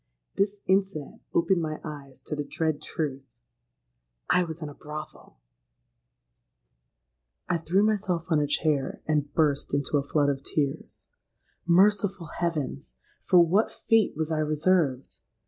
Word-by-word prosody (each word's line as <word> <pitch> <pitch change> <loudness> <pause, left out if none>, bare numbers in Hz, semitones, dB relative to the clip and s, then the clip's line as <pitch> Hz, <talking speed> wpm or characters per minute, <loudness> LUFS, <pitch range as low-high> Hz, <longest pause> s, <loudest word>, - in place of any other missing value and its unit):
This 200 +1 0
incident 190 -6 0
opened 170 +1 +2
my 155 -1 -3
eyes 140 -4 -9
to 150 - -5
the 145 - -2
dread 155 +1 -2
truth:—I 115 - -5
was 160 -1 -6
in - - -4
a 145 - -8
brothel! 150 - -9 2.1
"I 170 - 0
threw 180 +5 +2
myself 195 -6 0
on 160 -3 +3
a 145 - +1
chair 145 -2 0
and 150 -2 0
burst 145 -3 +1
into 140 +1 0
a - - -3
flood 145 0 +1
of 135 -1 -2
tears. 140 -1 -3 0.6
Merciful 195 -1 +3
heavens! 155 - -3 0.3
for 180 - +5
what 195 +7 +2
fate 225 -2 +2
was 160 0 -2
I 155 - 0
reserved? 155 -3 +1
155 Hz, 130 wpm, -27 LUFS, 140-175 Hz, 2.1 s, for